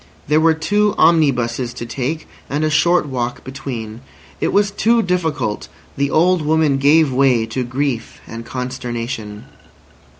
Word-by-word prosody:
There 150 +2 +3
were 160 0 +4
two 205 +6 +1
omnibuses 125 -7 +2
to 120 - -6
take, 135 +6 -4 0.2
and 145 +2 -1
a 155 - +1
short 170 +3 +3
walk 125 -3 -4
between. 125 -4 -7 0.4
It - - 0
was 205 0 +2
too 225 +3 +2
difficult! 160 - -2 0.3
The 140 0 0
old 175 +4 +3
woman 155 -2 +2
gave 145 0 +4
way 125 -3 +3
to 120 +3 -3
grief 125 -1 -3
and 115 0 -8
consternation. 120 -4 -5
140 Hz, 140 wpm, -18 LUFS, 120-160 Hz, 0.4 s, were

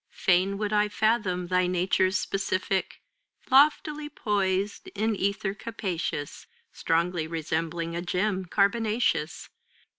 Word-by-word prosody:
Fain 190 +2 +2
would 210 0 -2
I 210 0 +3
fathom 210 -5 +1
thy 180 0 +2
nature's 185 +1 +2
specific 190 -1 -2 0.5
Loftily 295 +2 +4
poised 200 -6 -1
in 215 +1 0
ether 200 0 -1
capacious. 185 -9 -4 0.3
Strongly 165 0 0
resembling 165 +1 -3
a 170 - -2
gem 185 +2 -1
carbonaceous. 210 -3 0
190 Hz, 100 wpm, -27 LUFS, 180-210 Hz, 0.5 s, Loftily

